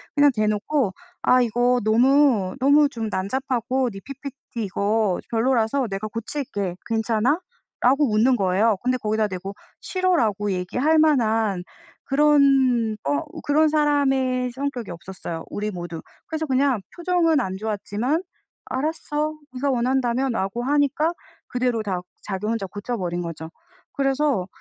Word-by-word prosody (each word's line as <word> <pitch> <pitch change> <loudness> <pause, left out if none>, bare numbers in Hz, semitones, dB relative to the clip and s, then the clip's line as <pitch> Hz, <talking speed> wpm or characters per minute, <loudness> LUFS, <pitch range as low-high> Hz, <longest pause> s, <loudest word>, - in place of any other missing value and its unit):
그냥 290 -1 +6
대놓고 215 +2 0 0.3
"아 255 0 +5
이거 245 +1 +2
너무, 235 -3 +3
너무 285 +2 +5
좀 225 -4 -4
난잡하고 250 +5 -1
네 195 - -8
ppt 275 -4 -7
이거 200 0 0
별로라서 240 +2 +1
내가 195 +2 -3
고칠게. 215 -4 -4
괜찮아?"라고 255 - 0
웃는 240 +4 +4
거예요. 195 +3 +2
근데 255 +1 +1
거기다 215 -2 0
대고 195 +1 -6 0.3
"싫어."라고 230 - +1
얘기할 250 - +1
만한 225 - +2 0.4
그런 270 -6 +3
어 140 0 +1 0.2
그런 310 +2 +3
사람의 270 -4 +1
성격이 265 -4 -4
없었어요 170 -1 -7
우리 210 +1 -3
모두. 175 -2 -6 0.3
그래서 315 0 -3
그냥 265 -4 +2
표정은 345 -3 +2
안 190 -4 -3
좋았지만 220 - -2 0.4
"알았어. 305 +2 -2 0.2
네가 270 +2 -1
원한다면."라고 240 -3 0
하니까 290 +3 +2 0.4
그대로 245 -3 -1
다 190 -4 -2 0.2
자기 200 +1 -4
혼자 220 -3 -1
고쳐버린 185 -4 -3
거죠. 165 -1 -6 0.4
그래서 275 -7 +1
245 Hz, 295 characters per minute, -23 LUFS, 210-280 Hz, 0.4 s, 그냥